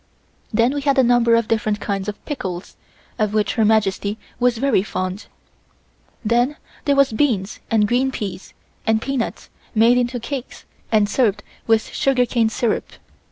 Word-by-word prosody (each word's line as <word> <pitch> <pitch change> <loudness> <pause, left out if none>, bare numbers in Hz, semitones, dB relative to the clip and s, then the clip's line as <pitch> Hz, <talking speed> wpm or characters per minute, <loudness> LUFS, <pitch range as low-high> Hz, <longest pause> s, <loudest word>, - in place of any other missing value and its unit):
Then 230 +4 +2
we 290 - -2
had 280 0 +1
a 265 - +6
number 240 -1 +4
of 230 -1 +1
different 215 -2 0
kinds 195 -1 -3
of 205 - -9
pickles, 190 - -5 0.4
of 215 -1 0
which 210 -1 +1
Her 225 - +2
Majesty 210 -1 +1 0.2
was 245 -1 +2
very 265 -5 +2
fond. 185 0 -4 1.0
Then 240 +6 +2 0.3
there 285 - +3
was 275 -4 +4
beans 215 -6 0
and 215 -2 +3
green 255 +4 +1
peas, 205 -6 -6 0.3
and 220 0 +3
peanuts 265 0 -3 0.2
made 235 +3 +5
into 245 0 -1
cakes 260 +2 -6 0.3
and 215 -2 +4
served 215 -2 +1 0.2
with 225 -1 +3
sugarcane 245 -4 +2
syrup. 225 0 -1
230 Hz, 155 wpm, -21 LUFS, 210-250 Hz, 1.0 s, a